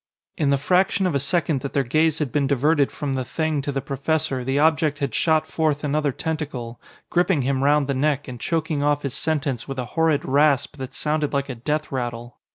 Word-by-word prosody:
In 145 Hz, -3 st, +1 dB
the 140 Hz, -, +3 dB
fraction 185 Hz, +6 st, +2 dB
of 180 Hz, -, +1 dB
a 140 Hz, -, +1 dB
second 155 Hz, -1 st, 0 dB
that 140 Hz, -, -5 dB
their 140 Hz, -, +2 dB
gaze 155 Hz, +5 st, +2 dB
had 150 Hz, -6 st, -2 dB
been 145 Hz, -2 st, +1 dB
diverted 145 Hz, +2 st, +2 dB
from 145 Hz, -2 st, -3 dB
the 130 Hz, -1 st, -1 dB
Thing 155 Hz, +2 st, -1 dB
to 145 Hz, -, -3 dB
the 135 Hz, -1 st, -3 dB
professor, 140 Hz, -1 st, -1 dB
the 135 Hz, +2 st, -1 dB
object 155 Hz, 0 st, +2 dB
had 140 Hz, -5 st, -2 dB
shot 160 Hz, -2 st, +2 dB
forth 155 Hz, -2 st, -1 dB
another 150 Hz, 0 st, +1 dB
tentacle, 140 Hz, -6 st, -4 dB, 0.3 s
gripping 175 Hz, -4 st, +2 dB
him 135 Hz, +1 st, 0 dB
round 145 Hz, 0 st, +3 dB
the 140 Hz, -, -1 dB
neck 145 Hz, +1 st, 0 dB
and 125 Hz, -2 st, -7 dB
choking 160 Hz, -1 st, -1 dB
off 145 Hz, 0 st, +1 dB
his 140 Hz, -3 st, -2 dB
sentence 145 Hz, -6 st, -1 dB
with 135 Hz, -1 st, -5 dB
a 125 Hz, -, -2 dB
horrid 160 Hz, -3 st, +2 dB
rasp 145 Hz, 0 st, +2 dB
that 130 Hz, -1 st, -7 dB
sounded 150 Hz, -1 st, -1 dB
like 140 Hz, 0 st, -1 dB
a -, -, -2 dB
death 150 Hz, +6 st, -2 dB
rattle. 120 Hz, -2 st, -4 dB
145 Hz, 215 wpm, -23 LUFS, 135-155 Hz, 0.3 s, the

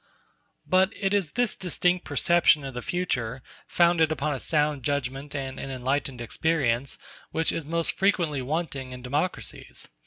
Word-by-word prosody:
But 185 Hz, +1 st, +4 dB
it 195 Hz, -1 st, +1 dB
is 195 Hz, -7 st, 0 dB
this 245 Hz, -3 st, +1 dB
distinct 180 Hz, 0 st, 0 dB
perception 170 Hz, -4 st, +4 dB
of 135 Hz, -, -5 dB
the 125 Hz, -, -4 dB
future, 130 Hz, -8 st, -2 dB, 0.2 s
founded 170 Hz, -2 st, +4 dB
upon 150 Hz, -1 st, 0 dB
a 135 Hz, -, -3 dB
sound 150 Hz, -1 st, +1 dB
judgment 140 Hz, +1 st, -2 dB
and 135 Hz, -2 st, -4 dB
an 135 Hz, -, -5 dB
enlightened 130 Hz, 0 st, -2 dB
experience, 135 Hz, 0 st, 0 dB, 0.3 s
which 160 Hz, 0 st, +1 dB
is 160 Hz, -3 st, -4 dB
most 165 Hz, +1 st, +1 dB
frequently 175 Hz, -8 st, +1 dB
wanting 135 Hz, -2 st, -3 dB
in 125 Hz, -1 st, -9 dB
democracies. 145 Hz, +8 st, -3 dB
150 Hz, 150 wpm, -26 LUFS, 130-170 Hz, 0.3 s, But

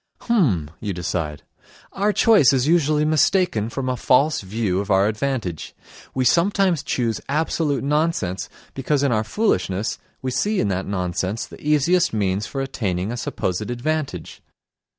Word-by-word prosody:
"H'm!" 115 Hz, -, +1 dB
you 105 Hz, -2 st, -3 dB
decide. 80 Hz, -4 st, -3 dB, 0.5 s
"Our 205 Hz, +2 st, +1 dB
choice 205 Hz, -, +5 dB
is 130 Hz, +1 st, +1 dB
usually 155 Hz, -2 st, +3 dB
mistaken 155 Hz, -, +2 dB
from 130 Hz, +2 st, -4 dB
a 130 Hz, -, 0 dB
false 135 Hz, +5 st, +2 dB
view 95 Hz, -1 st, -1 dB
of 100 Hz, +1 st, -4 dB
our 95 Hz, 0 st, +4 dB
advantage. 110 Hz, -, -3 dB, 0.4 s
We 130 Hz, -1 st, +1 dB
sometimes 180 Hz, 0 st, +3 dB
choose 120 Hz, -6 st, -1 dB
absolute 150 Hz, -1 st, 0 dB
nonsense 140 Hz, -, 0 dB, 0.2 s
because 135 Hz, +1 st, 0 dB
in 140 Hz, -, +2 dB
our 110 Hz, -2 st, +1 dB
foolishness 110 Hz, -, -1 dB, 0.2 s
we 130 Hz, -, -1 dB
see 205 Hz, +11 st, 0 dB
in 105 Hz, -, +1 dB
that 95 Hz, 0 st, -2 dB
nonsense 95 Hz, +2 st, -2 dB
the -, -, -13 dB
easiest 150 Hz, +3 st, +2 dB
means 100 Hz, -1 st, 0 dB
for 135 Hz, -, -4 dB
attaining 100 Hz, -7 st, -2 dB
a -, -, -3 dB
supposed 105 Hz, -3 st, -3 dB
advantage. 130 Hz, -, -3 dB
125 Hz, 150 wpm, -22 LUFS, 100-155 Hz, 0.5 s, choice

